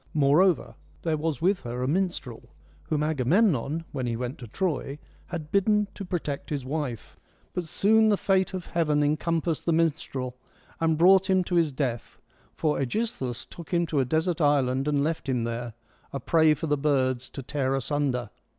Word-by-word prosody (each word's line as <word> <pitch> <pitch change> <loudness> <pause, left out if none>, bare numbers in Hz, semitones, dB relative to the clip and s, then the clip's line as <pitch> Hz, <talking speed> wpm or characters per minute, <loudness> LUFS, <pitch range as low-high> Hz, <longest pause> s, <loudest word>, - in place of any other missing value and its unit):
Moreover, 155 +5 +3 0.3
there 160 -2 +1
was 155 -2 -2
with 190 +1 +3
her 125 +1 -4
a - - 0
minstrel, 170 -7 -2 0.4
whom 150 -1 0
Agamemnon, 155 - +1
when 130 -3 -3
he 115 - -1
went 125 +3 -4
to 120 - -8
Troy, 145 - -2 0.3
had 160 -3 -6
bidden 210 +1 +2
to 200 - -7
protect 170 -6 -4
his 140 -4 -3
wife. 135 -5 -4 0.4
But 180 - -2
soon 220 +6 +4
the 205 - +3
fate 190 -1 +1
of 185 - -5
heaven 150 -3 +1
encompassed 160 +2 0
the 170 - +3
minstrel, 140 -6 -1 0.4
and 160 -1 +2
brought 190 +3 +5
him 190 -1 +4
to 180 - -5
his 165 -3 +3
death, 130 -4 -3 0.4
for 150 -2 0
^Egisthus 135 - -2
took 170 -3 -11
him 170 -1 +2
to 155 -3 -1
a 130 - +2
desert 160 +5 0
island 135 -2 +2
and 145 -1 +2
left 160 -2 -2
him 125 -3 0
there, 115 0 -4 0.4
a 140 - -3
prey 160 0 +4
for 150 - -4
the 145 -1 +1
birds 130 -3 +1
to 135 - -7
tear 135 0 -1
asunder. 135 -4 -1
150 Hz, 180 wpm, -27 LUFS, 130-170 Hz, 0.4 s, brought